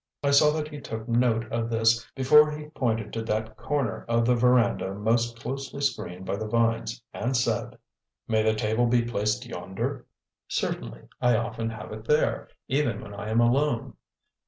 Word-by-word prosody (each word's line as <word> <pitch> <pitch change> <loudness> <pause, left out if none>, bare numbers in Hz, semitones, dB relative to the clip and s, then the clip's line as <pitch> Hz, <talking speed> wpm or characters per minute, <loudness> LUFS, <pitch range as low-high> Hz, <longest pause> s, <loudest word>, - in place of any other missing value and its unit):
I 140 - +2
saw 140 +2 +6
that 155 -1 -3
he 145 -1 -8
took 110 -2 -6
note 115 -1 +2
of 115 0 -1
this 115 0 +2
before 150 +3 +6
he 150 0 -7
pointed 115 -7 -2
to 115 - -2
that 110 0 -2
corner 130 -5 -2
of 115 0 +2
the 125 - +4
veranda 120 -5 +2
most 115 +3 0
closely 135 +3 -5
screened 95 -10 -2
by 100 - -2
the 110 +1 -4
vines 115 +1 0
and 125 +1 -1
said: 120 - -1 0.5
"May 110 -1 +2
the 110 0 +2
table 110 +3 +1
be 120 0 +3
placed 115 +1 -1
yonder?" 95 -3 -5 0.4
"Certainly; - - -3 0.2
I 125 -1 +4
often 115 0 -2
have 110 -2 -8
it 110 0 -8
there, 150 +4 +1 0.2
even 145 +3 0
when 100 -2 -9
I 100 +1 -6
am 110 +1 +2
alone." 120 +1 +1
115 Hz, 175 wpm, -26 LUFS, 110-125 Hz, 0.5 s, saw